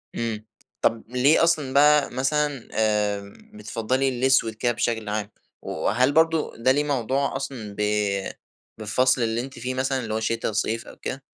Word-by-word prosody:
امم 110 -2 -3 0.4
طب 115 -1 +1
ليه 130 +7 +4
أصلًا 155 -6 +1
بقى 150 +1 +5
مثلًا 145 0 -1
آآ 105 -2 0 0.2
بتفضّلي 130 - -1
الأسود 130 -2 +2
كده 120 +3 0
بشكل 115 -2 -2
عام؟ 105 -1 -2 0.3
وهل 125 +6 +1
برضه 160 +1 +2
ده 115 +3 +3
ليه 145 +2 +2
موضوع 140 -1 -1
أصلًا 110 -7 -5
ب - - +1 1.0
بالفصل 125 +4 +1
اللي 115 +1 0
أنتِ 135 +1 -9
فيه 125 +2 -3
مثلًا 130 +1 -1
اللي 110 -3 -4
هو 110 - 0
شتا، 115 0 -1
صيف 115 +2 -2
أوكده؟ 135 - -6
125 Hz, 155 wpm, -24 LUFS, 110-135 Hz, 1.0 s, بقى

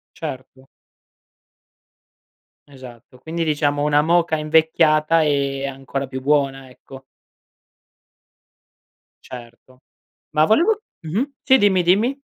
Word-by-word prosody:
Certo. 130 0 -9 2.0
Esatto. 125 -2 -14
Quindi 165 +4 -4
diciamo, 145 -2 -1
una 150 0 +2
moka 165 0 +1
invecchiata 155 +1 +2
è 140 -2 -1
ancora 135 0 -5
più 130 0 -7
buona, 135 -1 -1
ecco. 135 +1 -15 2.2
Certo. 125 +1 -13 0.5
Ma 155 0 +2
volevo 345 - +2 0.2
mh-mh, 205 - -3
sì 265 - +4
dimmi, 195 -5 +2
dimmi. 220 +11 +1
150 Hz, 90 wpm, -20 LUFS, 135-165 Hz, 2.2 s, sì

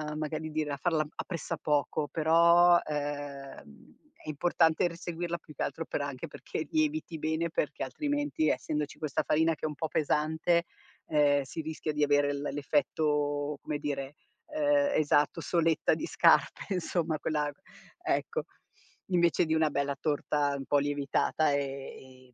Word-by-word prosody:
magari 155 +1 -3
dire 155 -1 -2
a 140 - -3
farla 155 0 +1
a - - -7
pressapoco. 150 -4 -1
Però, 170 +3 +5
ehm, 145 - -6 0.3
è - - -6
importante 165 +2 +2
r 170 - -7
seguirla, 170 0 -4
più 150 - -15
che - - -8
altro 165 - -2
per - - -3
anche 140 -3 -4
perché - - -6
lieviti 310 - 0
bene 160 +2 -1
perché - - -2
altrimenti, 290 +1 -1
essendoci 150 -2 -2
questa 155 -3 -1
farina 160 +1 +2
che 155 - -6
è - - +2
un 150 - -5
po' 160 - -2
pesante, 160 +3 +1 0.5
ehm, 145 -2 +3
si 135 +5 -6
rischia 155 0 -4
di 150 - -2
avere 145 0 +3
l 140 - -4
l'effetto, 145 0 0
come 150 - -3
dire, 145 -1 -4 0.3
ehm, 290 -2 +2
esatto, 145 -1 +2
soletta 165 -2 +2
di - - -3
scarpe 200 - +3
insomma, 170 -3 -1
quella 150 -2 -1 0.5
ecco, - - -1 0.6
invece 170 -2 +3
di 160 - 0
una 160 -1 +3
bella 140 -1 -1
torta 145 -1 0
un 135 - -6
po' 145 +1 +3
lievitata 145 +2 +1
e, 135 -2 -5
155 Hz, 150 wpm, -30 LUFS, 145-165 Hz, 0.6 s, Però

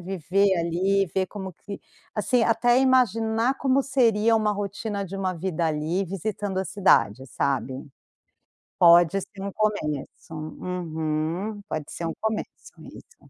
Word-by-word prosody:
viver 190 +2 +1
ali 185 +4 +1
e - - -9
ver 190 -1 +1
como 190 -1 -7
que 200 +4 -9 0.3
assim, 230 +3 +1
até 240 +2 +3
imaginar 235 -2 +2
como 270 0 +2
seria 230 -5 +3
uma 215 -1 +2
rotina 205 0 -4
de 195 +1 -7
uma 190 -1 -1
vida 170 -1 -2
ali, 160 +5 -1
visitando 195 +1 -3
a 190 - -1
cidade, 130 - +2
sabe. 135 0 -2 0.9
Pode 175 +2 +6
ser 195 +1 -11
um 200 - -4
começo. 165 -9 -3
Uhum. 160 +4 -3
Pode 155 -2 -3
ser 170 - -5
um 165 - -2
começo 220 0 -4
isso. 455 -2 -15
195 Hz, 140 wpm, -25 LUFS, 170-215 Hz, 0.9 s, Pode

